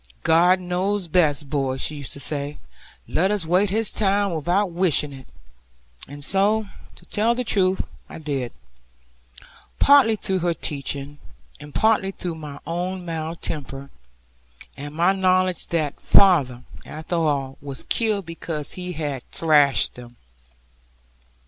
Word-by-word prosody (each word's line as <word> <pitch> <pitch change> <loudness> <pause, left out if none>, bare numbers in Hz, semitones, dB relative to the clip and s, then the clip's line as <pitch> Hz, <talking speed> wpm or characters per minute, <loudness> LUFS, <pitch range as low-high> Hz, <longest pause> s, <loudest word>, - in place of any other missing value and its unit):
'God 175 +3 +5
knows 185 +2 -1
best, 150 -4 +2
boy,' 135 -3 0
she 150 +3 -3
used 140 -3 -7
to - - -9
say, 145 +1 -3 0.5
'let 185 +4 +1
us 205 -5 0
wait 185 +5 +3
His 220 +3 0
time, 200 -2 +1
without 175 +5 0
wishing 165 -5 +1
it.' 130 -1 -12 0.8
And 145 +1 -9
so, 205 +6 +2 0.3
to - - -18
tell 225 +3 +1
the 250 - -1
truth, 190 -4 +1 0.3
I - - -8
did; 140 -6 -3 1.3
partly 275 -6 +6
through 190 -2 -1
her 170 -1 0
teaching, 145 -1 -3 0.4
and 150 0 -11
partly 220 -3 +3
through 180 -3 -4
my 150 -3 -8
own 180 +2 -3
mild 165 0 -5
temper, 140 -2 -5 0.8
and 145 +2 -8
my 175 +4 +3
knowledge 185 -1 +1
that 155 -4 -2
father, 140 -11 +4 0.2
after 160 +3 -4
all, 140 -4 -1
was 140 -1 -7
killed 215 -4 0
because 165 -2 -4
he 180 -1 -5
had 145 -5 -3
thrashed 150 -4 +3
them. 120 0 -12
165 Hz, 135 wpm, -23 LUFS, 145-190 Hz, 1.3 s, partly